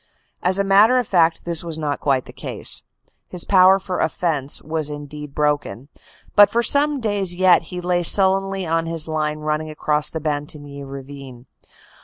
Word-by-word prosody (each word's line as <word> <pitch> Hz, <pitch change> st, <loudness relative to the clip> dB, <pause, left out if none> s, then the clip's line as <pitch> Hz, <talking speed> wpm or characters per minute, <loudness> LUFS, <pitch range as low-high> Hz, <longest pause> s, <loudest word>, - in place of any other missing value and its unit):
As 185 Hz, +1 st, +3 dB
a 200 Hz, -, +2 dB
matter 205 Hz, +6 st, +4 dB
of 250 Hz, -4 st, -1 dB
fact 165 Hz, -3 st, +1 dB
this 170 Hz, -1 st, +1 dB
was 165 Hz, -2 st, -5 dB
not 150 Hz, -2 st, -3 dB
quite 135 Hz, -3 st, 0 dB
the -, -, -13 dB
case. -, -, -3 dB, 0.5 s
His 180 Hz, -, -3 dB
power 190 Hz, 0 st, +5 dB
for 185 Hz, -1 st, -5 dB
offense 155 Hz, -4 st, -1 dB
was 155 Hz, 0 st, -4 dB
indeed 145 Hz, 0 st, -9 dB
broken, 145 Hz, -4 st, -2 dB, 0.5 s
but 205 Hz, -1 st, +7 dB
for 235 Hz, +1 st, 0 dB
some 290 Hz, +2 st, +2 dB
days 205 Hz, -6 st, -1 dB
yet 185 Hz, -2 st, +3 dB
he 180 Hz, -, -6 dB
lay 180 Hz, 0 st, 0 dB
sullenly 195 Hz, +1 st, +3 dB
on 165 Hz, 0 st, -1 dB
his 165 Hz, -1 st, +1 dB
line 155 Hz, -1 st, -2 dB
running 155 Hz, +1 st, -3 dB
across 150 Hz, 0 st, 0 dB
the 160 Hz, -, -5 dB
Bantigny 145 Hz, -1 st, -5 dB
Ravine. 135 Hz, -2 st, -10 dB
160 Hz, 170 wpm, -20 LUFS, 150-190 Hz, 0.5 s, but